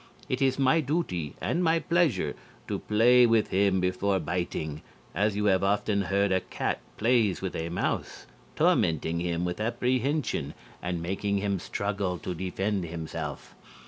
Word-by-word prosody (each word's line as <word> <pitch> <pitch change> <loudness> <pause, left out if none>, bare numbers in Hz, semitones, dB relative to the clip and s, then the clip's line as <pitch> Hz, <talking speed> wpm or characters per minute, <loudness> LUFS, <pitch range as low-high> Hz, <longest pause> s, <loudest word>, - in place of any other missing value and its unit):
It 130 +2 -2
is 135 -1 +2
my 140 +4 +4
duty, 130 - -2
and 175 - 0
my 165 -1 +3
pleasure, 160 - +1 0.3
to - - -2
play 120 +3 +5
with 115 -2 +3
him 95 0 +2
before 95 +2 +1
biting, 80 -3 -3 0.3
as 105 +3 +1
you 105 0 0
have 95 -2 +3
often 100 +1 +1
heard 100 +1 +1
a 95 - +3
cat - - -2 0.2
plays 115 -4 +2
with 95 - -3
a 80 +1 -3
mouse, 85 - -2 0.3
tormenting 80 +1 +2
him 85 0 -1
with 90 +4 -3
apprehension 125 - 0 0.3
and 90 -1 -3
making 100 +3 -1
him 100 -1 -1
struggle 100 -1 -2
to 90 - -5
defend 95 +2 -2
himself.... 80 -3 -6
100 Hz, 150 wpm, -28 LUFS, 90-115 Hz, 0.3 s, play